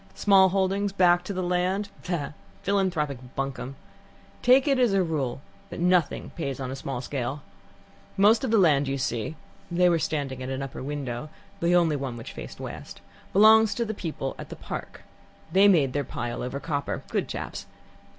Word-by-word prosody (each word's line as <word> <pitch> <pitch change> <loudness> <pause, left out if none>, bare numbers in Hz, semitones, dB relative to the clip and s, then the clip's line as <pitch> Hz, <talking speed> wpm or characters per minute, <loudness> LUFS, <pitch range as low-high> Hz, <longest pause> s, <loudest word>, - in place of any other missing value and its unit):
Small 195 -2 +5
holdings, 195 +1 0
back 175 -2 +4
to - - -4
the 185 -1 -2
land 180 +3 0 0.2
ah! 155 -5 -2 0.3
philanthropic 170 -9 0 0.2
bunkum. 135 -1 -4 0.7
Take 255 +3 +5
it 275 -2 +3
as 240 -5 +3
a 190 - +3
rule 140 -6 -2 0.3
that - - -7
nothing 175 -3 +1
pays 140 -5 -4
on 130 -1 -4
a - - -4
small 135 -2 -4
scale. 135 +2 -4 0.7
Most 210 +4 +5
of 260 - 0
the 225 - +4
land 145 -7 +4
you 135 0 -1
see 120 +1 -2 0.3
(they 180 +1 +3
were 170 -1 +2
standing 140 -5 -2
at 130 - -4
an 135 +1 -3
upper 135 - -7
window, 135 -1 -4 0.3
the 175 -1 +3
only 165 -4 +3
one 135 -3 -4
which 115 - -8
faced - - -9
west) - - -8 0.3
belongs 220 +2 +6
to 235 - 0
the 220 - -3
people 160 -8 -4
at - - -8
the - - -7
Park - - -7 0.5
they 195 +4 +6
made 150 -10 +4
their 145 - 0
pile 120 -2 -4
over 125 +3 -4
copper 145 -2 -3
good - - -1
chaps. - - -6
165 Hz, 180 wpm, -26 LUFS, 135-195 Hz, 0.7 s, belongs